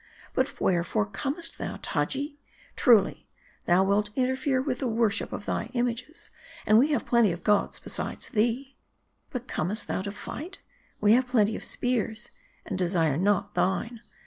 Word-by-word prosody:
But - - -1
wherefore 185 +4 +1
comest 275 - -4
thou, - - -4
Taji? 285 +1 -2 0.4
Truly, 230 -7 +4 0.4
thou 180 +2 +5
wilt 205 +2 +2
interfere 260 +1 +1
with 260 -2 -2
the 265 - -1
worship 225 -2 +1
of 205 - -5
thy - - -1
images, 245 +5 -3 0.3
and 215 +1 +6
we 270 - +5
have 290 -6 0
plenty 235 -5 +4
of 170 +1 -6
gods 210 -1 +2
besides - - -4
thee. 245 +4 0 0.5
But 250 -2 -5
comest 200 +7 -2
thou - - -1
to 200 +1 -4
fight? 325 - -7 0.4
We 210 +1 +5
have 250 +1 +3
plenty 220 -4 +2
of - - -6
spears, 235 -2 -1 0.3
and 190 -4 -4
desire 170 -5 +2
not 200 +5 +1
thine. 190 +6 0
225 Hz, 155 wpm, -27 LUFS, 200-255 Hz, 0.5 s, and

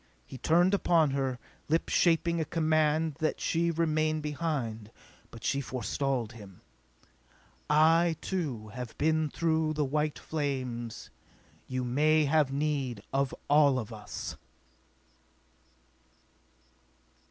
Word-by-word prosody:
He 130 - -10
turned 175 +7 +3
upon 165 -6 +3
her, 135 -2 -1 0.3
lips 165 +2 0
shaping 170 -1 +3
a - - +2
command 155 -1 +1
that 155 -1 0
she 170 +1 +1
remain 155 -1 +1
behind. 145 -8 -3 0.4
But 115 0 -12
she 140 - 0
forestalled 130 -2 -2
him. 100 -6 -13 1.1
"I, 160 +2 +4
too, 140 - -3
have 120 +1 -7
been 155 0 +1
through 160 -1 0
the 150 -1 0
white 150 +2 -1
flames! 130 -6 -4 0.6
You 130 0 -2
may 150 +5 +3
have 145 -1 +2
need 140 -6 -2
of 135 -1 +1 0.2
all 145 -2 +5
of 115 -2 -5
us!" 105 -1 -7
150 Hz, 110 wpm, -29 LUFS, 130-160 Hz, 1.1 s, all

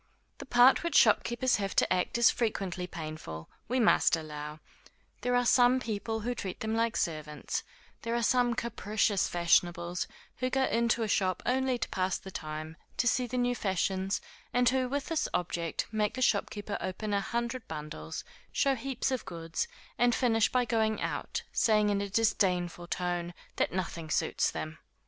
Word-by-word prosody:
The - - -8
part 245 +1 +6
which 340 - +2
shopkeepers 245 +2 +4
have 195 -2 -3
to - - +3
act 180 +5 0
is 235 - +6
frequently 195 -6 -2
painful, 155 - -7 0.2
we 255 +1 0
must 220 -6 +5
allow; 150 -1 -6 0.6
there 245 0 +1
are 245 0 +3
some 245 +1 +5
people 225 -1 -3
who 245 +3 -1
treat 190 -6 -6
them 220 0 -1
like 230 0 +1
servants; 155 -4 -2 0.4
there 230 0 -2
are 235 - 0
some 245 0 +3
capricious 215 -4 0
fashionables, 175 0 +1 0.3
who 255 0 -1
go 265 +1 +1
into 235 -2 +2
a - - -1
shop 185 -3 +1
only 260 0 +1
to - - -2
pass 185 0 0
the 190 - -10
time, 155 0 -6 0.2
to 240 - +2
see 250 +2 +2
the 250 - -3
new 245 0 +2
fashions, 190 -2 -1 0.3
and 245 0 +4
who, 255 -1 0
with 285 +1 -2
this 325 -2 -1
object 170 -2 -1
make 215 -1 0
the 255 - 0
shopkeeper 205 -1 0
open 205 +3 -3
a 200 - +2
hundred 235 +3 -3
bundles, 150 - -6 0.3
show 275 - +2
heaps 265 +1 -2
of 260 -3 -1
goods, 165 - -4 0.3
and 245 -1 +4
finish 225 -3 +2
by 250 -1 +2
going 220 -2 +1
out, - - -3
saying 210 -2 +3
in 200 0 +1
a 200 - -3
disdainful 180 -5 +1
tone 175 -1 -2 0.2
that - - +1
nothing 170 -3 -4
suits - - +1
them. 155 0 -6
210 Hz, 170 wpm, -30 LUFS, 175-245 Hz, 0.6 s, part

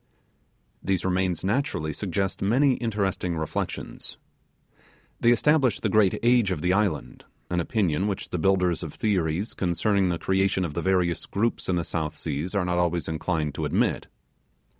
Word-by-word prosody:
These 95 -2 -1
remains 90 -2 0
naturally 95 - -1
suggest 95 +2 -2
many 130 +7 +3
interesting 100 -6 -1
reflections. 80 0 -4 1.0
They 120 - +4
establish 130 -2 +3
the - - -1
great 105 -3 +4
age 120 -4 +4
of 90 -5 -2
the 90 +1 +2
island, 100 -6 -1 0.3
an 90 - +1
opinion 95 -1 0
which 100 -2 -3
the 90 - -3
builders 90 -2 +2
of 80 -4 -7
theories 95 -2 0
concerning, 95 +2 +1
the 85 - 0
creation 95 +1 +1
of 80 - -5
the 85 - -2
various 90 -2 +1
groups 115 +1 -1
in 90 - +2
the 85 - 0
South 80 -1 -3
Seas 80 +5 -3
are 100 -2 +1
not 90 0 0
always 85 -3 0
inclined 80 -1 -1
to - - -4
admit. - - 0
95 Hz, 160 wpm, -26 LUFS, 85-100 Hz, 1.0 s, They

